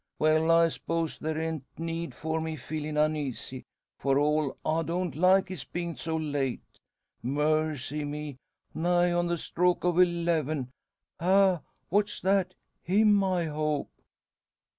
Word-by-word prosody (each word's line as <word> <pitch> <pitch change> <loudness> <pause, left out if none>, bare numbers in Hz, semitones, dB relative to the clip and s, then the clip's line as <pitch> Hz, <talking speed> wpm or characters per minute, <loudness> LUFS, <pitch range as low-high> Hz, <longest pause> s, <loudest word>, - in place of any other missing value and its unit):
Well, 155 +1 +3
I 165 0 +6
'spose 165 0 -3
there 155 0 -2
an't 160 -3 -2
need 165 0 -4
for 160 +1 -2
me 160 0 -3
feelin' 150 +2 -4
uneasy. 145 -4 -1 0.3
For 135 0 +2
all, 150 -1 +1
I 160 +1 +1
don't 170 0 -2
like 185 +3 +4
his 180 -9 -6
bein' 170 -1 -4
so 160 -1 -3
late. 145 -5 -2 0.6
Mercy 150 +1 0
me! 145 -1 -5 0.4
Nigh 175 +1 +2
on 175 0 +1
the 170 0 0
stroke 180 +2 0
o' 175 0 +2
eleven? 165 -6 +1 0.5
Ha! 185 -1 +4 0.3
What's 205 +3 +1
that? 190 -1 +1 0.3
Him 205 +2 +4
I 185 -3 +1
hope." 150 -1 -2
160 Hz, 135 wpm, -28 LUFS, 150-175 Hz, 0.6 s, I